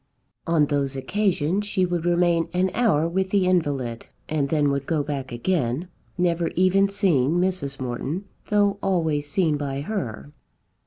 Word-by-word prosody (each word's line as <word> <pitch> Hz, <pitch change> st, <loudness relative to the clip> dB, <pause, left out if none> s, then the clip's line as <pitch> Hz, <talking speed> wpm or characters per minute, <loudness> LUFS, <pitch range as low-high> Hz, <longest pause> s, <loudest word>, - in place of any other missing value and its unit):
On 165 Hz, -3 st, +3 dB
those 140 Hz, -2 st, -1 dB
occasions 185 Hz, +4 st, 0 dB
she 190 Hz, -3 st, +1 dB
would 175 Hz, -2 st, -2 dB
remain 175 Hz, -1 st, +2 dB
an 185 Hz, +1 st, +1 dB
hour 195 Hz, -10 st, +2 dB
with 190 Hz, +2 st, -1 dB
the 195 Hz, -1 st, +2 dB
invalid, 140 Hz, -10 st, 0 dB, 0.2 s
and 145 Hz, -3 st, -1 dB
then 145 Hz, -2 st, +2 dB
would 140 Hz, -1 st, -2 dB
go 155 Hz, -3 st, +1 dB
back 140 Hz, -3 st, -4 dB
again, 135 Hz, +3 st, -1 dB, 0.3 s
never 170 Hz, -1 st, +1 dB
even 185 Hz, +2 st, +3 dB
seeing 170 Hz, -9 st, +2 dB
Mrs. 175 Hz, -6 st, -1 dB
Morton, 130 Hz, +9 st, -3 dB, 0.2 s
though 205 Hz, -1 st, +2 dB
always 160 Hz, -6 st, 0 dB
seen 160 Hz, -2 st, +1 dB
by 140 Hz, -1 st, -3 dB
her. 120 Hz, -, -4 dB
165 Hz, 150 wpm, -24 LUFS, 140-185 Hz, 0.3 s, On